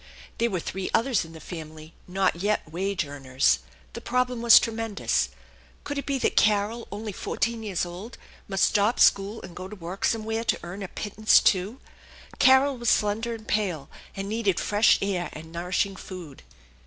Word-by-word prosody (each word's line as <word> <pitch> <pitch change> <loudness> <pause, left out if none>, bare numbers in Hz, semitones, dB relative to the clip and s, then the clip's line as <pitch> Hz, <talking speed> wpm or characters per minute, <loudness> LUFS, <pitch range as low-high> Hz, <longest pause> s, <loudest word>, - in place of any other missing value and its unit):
There 235 - +2
were 185 -5 -2
three 185 +3 -4
others 235 -2 +2
in 165 - -13
the 160 - -10
family, 155 -1 -9
not 190 0 +1
yet 205 +4 0
wage 185 +2 -2
earners. 130 - +1 0.3
The - - -7
problem 250 -1 0
was 235 -1 +9
tremendous. 225 -2 -1 0.5
Could 285 0 -3
it 280 - -7
be 280 -1 0
that - - 0
Carol, 215 +2 +2
only 210 +1 -5
four - - -6
teen 230 0 0
years 200 -5 -2
old, 180 +7 -9 0.3
must 195 -1 0
stop 210 +2 +2
school 200 +3 +3
and 170 - -10
go 185 - -7
to 210 - -9
work 180 +1 -8
somewhere 225 0 0
to - - 0
earn 180 +4 -7
a 195 - -4
pittance 215 +3 +3
also? 195 +5 +2 0.6
Carol 265 0 +5
was 235 -1 +1
slender 220 +3 +1
and 220 -1 -12
pale, 185 -9 -1 0.2
and 195 0 -4
needed 205 -4 0
fresh 210 +1 +4
air 185 -3 -1
and 160 +1 -10
nourishing 180 +3 -1
food. 180 -7 -10
200 Hz, 180 wpm, -26 LUFS, 180-225 Hz, 0.6 s, was